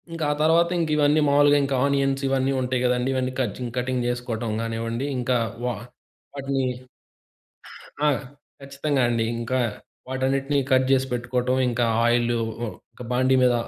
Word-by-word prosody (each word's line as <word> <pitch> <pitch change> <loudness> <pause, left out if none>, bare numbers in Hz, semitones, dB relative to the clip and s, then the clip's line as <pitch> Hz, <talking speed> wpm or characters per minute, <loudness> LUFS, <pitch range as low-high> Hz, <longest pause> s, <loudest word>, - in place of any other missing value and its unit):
ఇంకా 165 -1 -4
ఆ - - +2
తర్వాత 165 +2 +4
ఇంకివన్నీ 155 -2 +2
మావులుగా 145 0 +5
ఇంకా 135 0 -1
ఆనియన్స్ 135 -1 +1
ఇవన్నీ 135 0 +1
ఉంటాయి 125 0 -1
కదండీ. 125 +1 +1
ఇవన్నీ 130 0 -1
కజింగ్ 120 0 -3
కటింగ్ 125 0 -1
చేసుకోవటం 120 -2 -3
కానివ్వండి, 115 +2 -3
ఇంకా 125 0 +1 0.3
వా 125 -1 -1 0.6
వాటిని 135 -1 -1 1.4
ఆ! - - +5 0.5
ఖచ్చితంగా 140 0 -1
అండి. 115 -1 +1 0.2
ఇంకా 130 +2 -1 0.5
వాటన్నిటిని 135 +2 0
కట్ 130 0 +4
చేసి 135 0 +3
పెట్టుకోవటం 125 +1 -1
ఇంకా 120 0 0 0.2
ఆయిలు 120 0 +2 0.3
ఉ - - -3 0.4
బాండీ 130 +1 +3
మీద 125 -1 +4
130 Hz, 135 wpm, -24 LUFS, 120-140 Hz, 1.4 s, మావులుగా